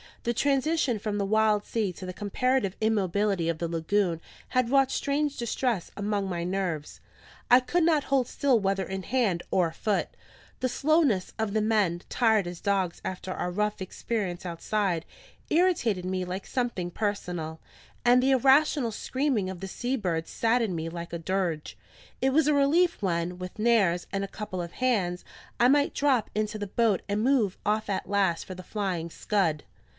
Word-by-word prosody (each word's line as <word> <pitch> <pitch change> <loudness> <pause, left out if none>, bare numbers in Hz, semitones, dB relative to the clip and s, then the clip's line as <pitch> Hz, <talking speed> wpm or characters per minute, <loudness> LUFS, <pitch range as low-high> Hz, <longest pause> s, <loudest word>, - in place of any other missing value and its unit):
The 235 - 0
transition 280 -1 +1
from 205 0 -3
the 200 - 0
wild 215 0 +3
sea 215 -4 -1
to 185 - -9
the 185 - -5
comparative 210 +1 0
immobility 200 -4 +1
of 165 - -1
the 170 - -1
lagoon 170 +1 0 0.3
had 255 -2 +1
wrought 270 0 +4
strange 285 0 -1
distress 235 -4 -1
among 205 -1 -1
my 175 -2 -3
nerves: 175 -5 -3 0.5
I 245 - +9
could 335 +7 0
not 315 -3 +3
hold 265 -3 +1
still 265 -4 +2
whether 195 -1 0
in 190 0 -5
hand 210 -7 +1
or 175 -3 +2
foot; 210 +4 -1 0.5
the 255 - 0
slowness 280 - +2
of 220 -2 -1
the 215 - +2
men, 210 -6 +1
tired 220 -5 +3
as 175 -1 -7
dogs 195 -3 0
after 185 0 -4
our 180 -1 -3
rough 210 +2 -1
experience 190 -1 -3
outside, 180 0 -1 0.5
irritated 310 - +2
me 185 0 -1
like 185 +2 -5
something 235 -9 -2
personal; 175 -6 -3 0.5
and 245 +1 +6
the 265 +1 +3
irrational 270 -1 +4
screaming 255 -3 -1
of 190 -2 -6
the 195 - -5
sea 245 +7 -2
birds 170 -8 -2
saddened 225 -4 +1
me 165 0 -3
like 170 0 -7
a 170 - -3
dirge. 170 -3 -2 0.4
It 265 - +3
was 305 0 +4
a 300 - +4
relief 325 +4 +3
when, 175 -1 -1
with 180 0 -7
Nares, 210 -7 +3
and 195 0 -1
a - - -3
couple 195 -3 -5
of 170 - -8
hands, 195 -9 0 0.3
I 240 - +6
might 285 +2 +3
drop 270 -6 +2
into 215 0 -1
the 205 -1 -4
boat 215 -1 +1
and 205 +1 0
move 240 -7 +2
off 215 0 0
at 195 -1 -2
last 195 -4 +1
for 185 - -7
the 185 - -9
Flying 185 -5 -3
Scud. 170 -8 0
205 Hz, 175 wpm, -27 LUFS, 180-245 Hz, 0.5 s, I